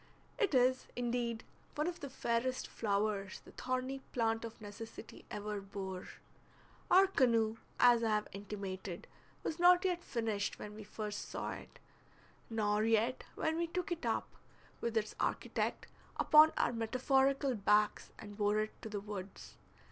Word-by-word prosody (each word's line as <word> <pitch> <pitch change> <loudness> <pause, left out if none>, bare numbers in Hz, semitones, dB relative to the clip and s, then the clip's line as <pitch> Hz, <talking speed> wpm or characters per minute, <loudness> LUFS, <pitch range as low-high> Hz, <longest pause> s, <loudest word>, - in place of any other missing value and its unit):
It 405 - +2
is, 255 +1 +3
indeed, 240 -2 -1 0.3
one 300 - 0
of 350 0 -3
the 280 - -6
fairest 255 0 -1
flowers 200 -2 -1
the - - -13
thorny 255 +1 -2
plant 225 -2 +1
of 230 0 -7
necessity 220 +1 -9
ever 210 0 -4
bore. 190 -2 -6 0.8
Our 380 +2 +8
canoe, 230 - +2 0.2
as 240 -1 +6
I 225 - +2
have 210 -1 +1
intimated, 195 -2 -6 0.4
was 325 - -3
not 355 +1 +6
yet 355 -2 0
finished 220 -4 -1
when 210 - -7
we 215 0 -8
first 210 0 -5
saw - - -3
it, - - -9 0.7
nor 210 -2 +1
yet 225 +3 +2
when 320 0 0
we 340 0 0
took 355 +1 -3
it 345 -1 -2
up, - - 0 0.5
with 230 -1 -1
its 215 -1 0
architect, - - -1 0.3
upon 310 +1 +7
our - - +2
metaphorical 265 +4 +2
backs 210 -1 +2
and 205 -1 -9
bore 205 0 +2
it 215 - -5
to 220 - -6
the 205 -1 -3
woods. 200 -2 -7
225 Hz, 150 wpm, -35 LUFS, 210-260 Hz, 0.8 s, Our